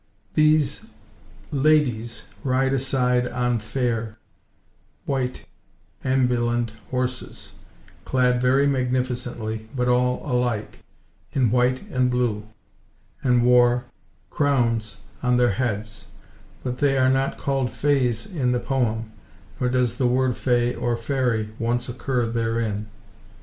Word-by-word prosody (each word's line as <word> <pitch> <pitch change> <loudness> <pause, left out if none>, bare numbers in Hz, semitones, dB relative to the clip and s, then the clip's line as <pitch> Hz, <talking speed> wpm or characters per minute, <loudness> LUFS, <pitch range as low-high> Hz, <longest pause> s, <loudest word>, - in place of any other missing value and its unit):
These 155 -1 +2 0.6
"ladies," 130 -6 +1 0.2
ride 135 0 +1
aside 125 -2 +1
"on 120 -1 0
fayre 115 -1 -2 0.9
[white] 130 -2 -2 0.6
ambulende 120 -3 +1 0.2
horses," 125 0 -4 0.5
clad, 125 -1 +2
very 130 +3 +4
magnificently, 125 -4 -2
but 125 -1 0
all 125 0 +2
alike, 125 -4 -1 0.5
in 130 -6 +2
white 125 +1 +1
and 125 -1 +2
blue, 120 -4 -1 0.7
and 125 -2 +3
wore 125 0 +4 0.5
"corownes 120 -6 +1 0.3
on 125 -1 +2
their 120 -2 +4
heades;" 105 -2 -3 0.6
but 125 -1 -3
they 140 -2 +3
are 130 0 +4
not 135 +1 +1
called 135 -2 0
fays 125 -6 +1
in 135 -9 -1
the 125 - +1
poem, 115 -4 -1 0.5
nor 125 - +1
does 125 -2 +1
the 130 - +2
word 125 0 +2
fay 120 -1 +1
or 120 -1 -1
fairie 120 -3 0
once 120 +1 0
occur 125 0 -1
therein. 115 -2 -1
125 Hz, 115 wpm, -24 LUFS, 120-130 Hz, 0.9 s, very